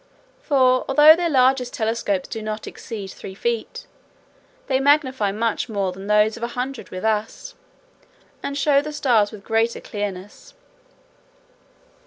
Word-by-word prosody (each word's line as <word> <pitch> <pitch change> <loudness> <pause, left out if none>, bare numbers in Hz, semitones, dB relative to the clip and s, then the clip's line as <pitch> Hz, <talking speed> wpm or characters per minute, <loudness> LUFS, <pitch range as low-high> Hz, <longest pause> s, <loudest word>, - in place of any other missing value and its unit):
For, 260 - +3
although 295 +3 +7
their 345 0 -1
largest 260 -3 +2
telescopes 220 -4 -1
do 225 - -6
not 215 0 -5
exceed 205 -5 -8
three 190 - -10
feet, 235 - -3 0.8
they 260 -1 +1
magnify 270 -7 +2
much 225 +3 -2
more 200 -3 -1
than 195 +2 -9
those 210 +1 +3
of 235 - -11
a 235 - -1
hundred 250 -5 -4
with 185 +3 -6
us, 220 - -2 0.9
and 280 - -4
show 280 0 +3
the 300 +1 -7
stars 235 -8 +2
with 210 -3 -11
greater 225 +2 0
clearness. 205 - -7
230 Hz, 140 wpm, -22 LUFS, 210-270 Hz, 0.9 s, although